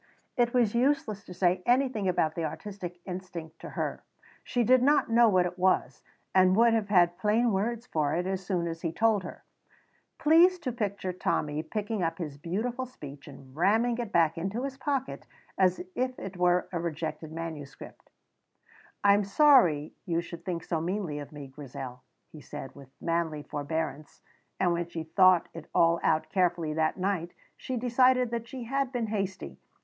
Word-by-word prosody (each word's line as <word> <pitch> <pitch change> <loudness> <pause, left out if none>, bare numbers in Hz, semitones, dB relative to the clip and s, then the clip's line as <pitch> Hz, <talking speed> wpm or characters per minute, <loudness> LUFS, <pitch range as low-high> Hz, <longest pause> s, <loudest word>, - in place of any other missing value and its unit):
It 240 -2 +2
was 240 -4 +2
useless 235 -5 +1
to 180 - -9
say 180 0 +2
anything 245 -5 +2
about 160 -3 +1
the 165 - -3
artistic 175 +2 -6
instinct 175 -4 -7
to - - -8
her; - - -4 0.4
she 245 - 0
did 255 +2 +5
not 285 -2 +3
know 235 0 +6
what 185 -3 +3
it 180 +1 -5
was, 180 -8 +1 0.3
and 185 0 +5
would 230 +1 +5
have 220 -3 0
had 175 -3 +4
plain 225 +3 +2
words 225 +4 -1
for 155 -9 0
it 175 +1 -1
as 190 0 -2
soon 180 -3 -1
as 165 0 -5
he 165 - -2
told 220 +3 +2
her. 180 - -9 0.7
Please 335 +4 +5
to 255 - -2
picture 200 -5 -3
Tommy 150 -4 -1
picking 210 +3 -3
up 165 -1 -1
his 150 -5 -6
beautiful 235 - -3
speech 145 - -11
and 135 -2 -13
ramming 225 +8 +2
it 235 -3 -4
back 165 -3 +2
into 195 +8 -3
his 275 -1 -4
pocket 270 -1 -3 0.3
as 185 -1 +2
if 255 0 -2
it 195 -1 -7
were 180 0 +2
a 175 - -2
rejected 160 -1 -4
manuscript. 160 -4 -8 0.9
"I 200 0 +7
am 205 +1 +3
sorry 200 - +4
you 170 -1 +1
should 170 0 -8
think 170 -2 -3
so 165 -2 -2
meanly 175 -4 -2
of 145 - -8
me, 145 -2 -8
Grizel," 130 -2 -8 0.3
he 155 - -11
said 145 -2 -8
with 140 -2 -14
manly 165 -3 -1
forbearance, 150 0 -4 0.4
and 175 -2 +3
when 170 0 -2
she 170 -1 -5
thought 180 +2 +4
it 165 -2 -10
all 170 0 +4
out 155 0 +1
carefully 175 -4 +1
that 155 0 0
night 185 -2 -2 0.2
she 255 - -4
decided 250 0 +3
that 235 -1 -3
she 255 0 -7
had 270 +2 -1
been 245 -3 -1
hasty. 195 -3 -4
185 Hz, 180 wpm, -28 LUFS, 165-230 Hz, 0.9 s, I